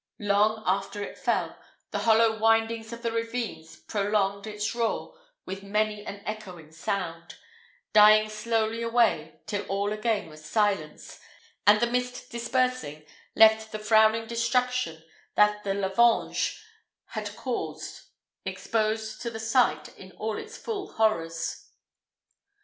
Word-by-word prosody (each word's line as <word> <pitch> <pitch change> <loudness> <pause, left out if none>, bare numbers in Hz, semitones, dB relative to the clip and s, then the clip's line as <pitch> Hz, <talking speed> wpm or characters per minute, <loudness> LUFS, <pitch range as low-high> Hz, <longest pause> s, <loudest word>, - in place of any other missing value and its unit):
Long 210 +1 +2
after 195 +2 -1
it - - -7
fell, - - -1 0.4
the - - -1
hollow 225 0 +4
windings 225 0 +2
of 235 +1 -8
the 230 - 0
ravines 230 -8 -4
prolonged 200 +1 -1
its 210 0 -3
roar 235 - -2 0.3
with 195 +1 -6
many 210 +1 -1
an 200 -1 -8
echoing 185 -7 -7
sound, 165 0 -4 0.6
dying 215 0 +7
slowly 220 +1 -1
away 230 -10 +1
till 205 -1 -2
all 200 +2 -1
again 215 -3 -1
was 155 -1 -13
silence, 195 -4 -1 0.5
and 210 +1 +7
the 240 - +3
mist 250 +1 -3
dispersing 235 - -1 0.3
left 220 0 +6
the 215 - -3
frowning 220 +1 +4
destruction 235 -6 0 0.3
that 210 0 +3
the 195 -1 -1
lavange 200 +4 +2 0.5
had - - -5
caused - - -5 0.4
exposed 220 0 -2
to 235 - -2
the 220 -1 -7
sight 225 +3 +1
in 190 -1 -12
all 220 0 -3
its 445 +2 -9
full 410 -4 -5
horrors. 165 -7 -1
215 Hz, 125 wpm, -27 LUFS, 200-230 Hz, 0.6 s, dying